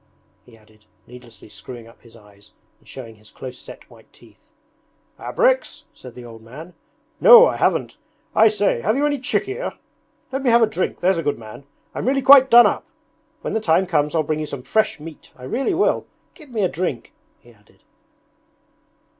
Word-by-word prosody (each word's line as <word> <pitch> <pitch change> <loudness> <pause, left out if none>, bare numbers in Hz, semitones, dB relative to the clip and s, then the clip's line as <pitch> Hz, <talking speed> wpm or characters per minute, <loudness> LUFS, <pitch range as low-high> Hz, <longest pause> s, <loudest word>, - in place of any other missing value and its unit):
he 115 -2 -19
added, 110 0 -26 0.2
needlessly 120 -2 -15
screwing 115 +3 -11
up 115 - -20
his 115 -1 -19
eyes 105 -2 -20 0.3
and - - -28
showing 115 -4 -11
his 105 0 -17
close 130 -1 -10
set - - -13
white - - -20
teeth. - - -23 0.7
'Abreks,' - - -1
said 125 -3 -14
the 125 - -11
old 115 -1 -13
man. 150 +10 -12 0.5
'No, - - +9
I - - -1
haven't. - - -1 0.4
I 220 +1 +5
say, 205 - 0
have 215 - 0
you 285 +2 0
any 290 -1 -1
chikhir? 400 - -3 0.5
Let 270 +1 -3
me 265 - 0
have 235 0 +4
a - - +6
drink, 215 -4 -4
there's 185 -1 +1
a - - -1
good 145 -2 -2
man. 110 +4 -12 0.3
I'm - - -5
really 270 0 0
quite 270 0 +7
done 240 0 +8
up. 205 - -1 0.5
When - - -5
the 220 - 0
time 180 -1 +2
comes 150 -3 -1
I'll 160 - +1
bring 155 +1 -3
you 155 - -4
some 140 -3 -8
fresh 215 +6 0
meat, 155 0 -12
I 125 - -16
really 270 - -2
will. 390 - 0 0.3
Give 305 -5 -16
me 225 -4 -2
a - - +3
drink!' 165 -9 -5 0.2
he 120 - -21
added. 105 -1 -29
160 Hz, 190 wpm, -20 LUFS, -, 0.7 s, No